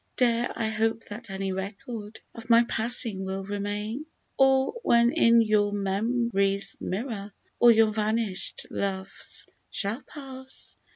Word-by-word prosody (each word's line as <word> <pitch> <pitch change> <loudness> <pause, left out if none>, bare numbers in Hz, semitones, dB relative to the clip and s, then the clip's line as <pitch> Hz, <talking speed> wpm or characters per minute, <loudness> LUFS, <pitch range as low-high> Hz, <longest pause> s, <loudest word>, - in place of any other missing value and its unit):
Dare 240 -1 +2
I 220 - -1
hope 225 +1 0
that 220 +2 -8
any 195 0 -3
record 205 +3 -6
of 230 0 -11
my 230 0 +7
passing 225 -4 +2
will 190 0 -4
remain? 205 +7 -4 0.3
Or, 265 +3 +3
when 235 - +4
in 230 -1 +5
your 210 -1 +2
mem'ry's 200 0 +1
mirror 205 0 -4 0.3
all 240 - +7
your 220 -1 +4
vanished 215 -2 -1
loves 190 -1 -1 0.2
shall 215 +6 -2
pass. 265 -1 -7
220 Hz, 125 wpm, -27 LUFS, 200-235 Hz, 0.3 s, my